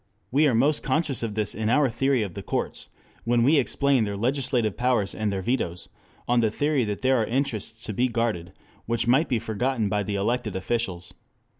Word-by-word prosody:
We 145 +4 +4
are 125 - +2
most 145 +6 +3
conscious 140 -1 0
of 110 -3 -3
this 105 -2 0
in 110 +1 -2
our 140 +3 +4
theory 130 0 +1
of 95 -4 -5
the - - -6
courts, - - -4 0.3
when 120 0 +2
we 145 +5 +5
explain 140 -1 +2
their 100 -1 -3
legislative 125 -2 0
powers 120 -5 +1
and 110 -1 -2
their 95 -1 -3
vetoes 90 -7 -2 0.4
on 120 0 +3
the 115 -2 +3
theory 145 +4 0
that 105 +3 -4
there 130 0 +4
are 110 - +1
interests 115 -3 -2
to 110 - -4
be 125 +6 +2
guarded 115 -8 -2 0.4
which 115 0 0
might 135 +7 +3
be 125 - +2
forgotten 115 0 -1
by 105 0 0
the 100 0 -3
elected 110 +1 -1
officials. 95 -3 -3
115 Hz, 200 wpm, -25 LUFS, 105-130 Hz, 0.4 s, we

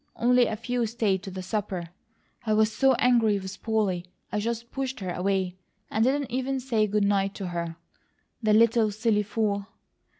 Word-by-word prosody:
Only 245 0 +4
a 220 - -2
few 235 +1 -1
stayed 215 -5 0
to 195 - -7
the 185 0 -6
supper. 190 -3 -3 0.5
I 215 -2 +1
was 215 0 +3
so 270 +4 +4
angry 230 -4 +3
with 190 0 -7
Polly 210 -6 0 0.3
I 210 - 0
just 235 +2 -3
pushed 265 -1 -3
her 185 -3 -3
away, 185 0 -1 0.3
and 220 - +2
didn't 270 +1 +1
even 265 +2 -1
say 230 -4 +1
good 210 0 +1
night 195 -1 +1
to 190 -3 -4
her. 170 -1 -3 0.7
The 215 -2 +3
little 230 0 +4
silly 215 0 +1
fool! 205 -1 -1
215 Hz, 175 wpm, -27 LUFS, 195-235 Hz, 0.7 s, Only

